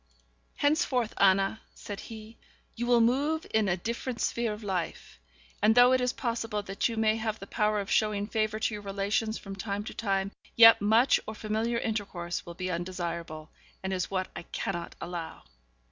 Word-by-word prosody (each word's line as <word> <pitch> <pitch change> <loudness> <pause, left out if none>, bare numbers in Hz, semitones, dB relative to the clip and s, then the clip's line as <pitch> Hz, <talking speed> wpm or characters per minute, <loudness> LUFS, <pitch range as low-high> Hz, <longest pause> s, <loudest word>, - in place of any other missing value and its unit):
'Henceforth, 285 -6 +1
Anna,' 195 +2 +3
said 205 -1 -7
he, 220 0 -10 0.4
'you 240 +1 -3
will 240 -1 +5
move 285 +7 +2
in 215 -3 +3
a 175 - +1
different 235 +5 -4
sphere 235 -2 0
of 210 +1 -7
life; 185 -4 -4 0.4
and 215 +2 +5
though 245 +1 +7
it 255 0 +3
is 250 0 +1
possible 230 -4 -2
that 195 +3 -1
you 230 - -5
may 220 0 +3
have 220 -1 -2
the 195 - -9
power 210 +1 +1
of 195 - -4
showing 210 -2 +2
favour 215 0 -1
to 220 0 0
your 210 - -5
relations 205 +2 -1
from 195 -1 -8
time 200 +1 -3
to - - -7
time, 195 -2 -1 0.2
yet 230 -2 +9
much 225 +5 +4
or 220 - -5
familiar 220 +2 -1
intercourse 195 -8 -3
will 170 - -7
be 185 +1 -3
undesirable, 170 -3 -4 0.3
and 190 0 -2
is 185 -1 -1
what 185 -1 -1
I - - -5
cannot 175 -3 -4
allow.' 170 -2 -6
215 Hz, 180 wpm, -29 LUFS, 195-230 Hz, 0.4 s, yet